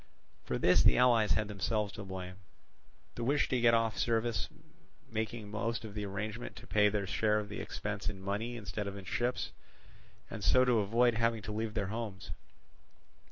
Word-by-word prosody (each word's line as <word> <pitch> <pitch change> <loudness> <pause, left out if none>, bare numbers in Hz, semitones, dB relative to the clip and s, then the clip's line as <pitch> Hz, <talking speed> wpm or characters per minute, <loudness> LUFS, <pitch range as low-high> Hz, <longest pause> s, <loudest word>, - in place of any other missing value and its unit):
For - - -1
this - - +5
the - - +5
allies 120 -4 +5
had 105 -1 0
themselves 105 +1 -1
to 105 - -7
blame; 95 -1 -7 0.8
the 120 - -4
wish 145 +4 +2
to 125 -2 +1
get 115 -1 +6
off 115 -1 +1
service 115 -4 0 0.6
making 110 -1 -3
most 115 +1 -2
of 105 - -8
them 105 0 -3
arrange 105 +3 -4
to - - -8
pay 105 -1 +4
their 100 -1 -1
share 105 +3 +2
of 105 -1 -6
the 105 - -5
expense 100 -1 -4
in 100 -2 -7
money 105 +5 -3
instead 100 -1 -4
of 100 0 -5
in 95 - -9
ships, 120 +7 -1 0.8
and 110 -3 -7
so 125 +9 +5
to 125 -3 +4
avoid 115 +4 +3
having 115 -1 +1
to 105 - -5
leave 110 +1 -3
their 100 -3 -1
homes. 110 -4 -5
110 Hz, 185 wpm, -33 LUFS, 100-115 Hz, 0.8 s, get